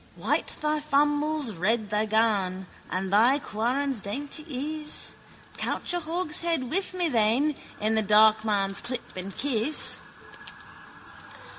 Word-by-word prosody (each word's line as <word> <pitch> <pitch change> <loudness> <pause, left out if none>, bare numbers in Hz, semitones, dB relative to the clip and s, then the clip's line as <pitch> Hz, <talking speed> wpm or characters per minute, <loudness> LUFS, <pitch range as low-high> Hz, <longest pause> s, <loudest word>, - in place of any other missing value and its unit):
White - - 0
thy 305 0 0
fambles, 295 -1 +1
red 210 +4 -1
thy 210 +1 +1
gan 205 -4 +1 0.2
And 190 +1 -3
thy 235 +7 +5
quarrons 260 +1 -2
dainty 280 +10 -3 0.4
is. 300 - 0 0.4
Couch - - -2
a 350 - +1
hogshead 330 -4 0
with 370 +2 0
me 355 -2 +1
then. 245 +3 +2 0.3
In 215 +1 0
the 220 - +2
darkmans 210 -1 +3
clip 245 0 -5
and 185 +1 -7
kiss. 275 +1 +2
235 Hz, 120 wpm, -26 LUFS, 210-300 Hz, 0.4 s, thy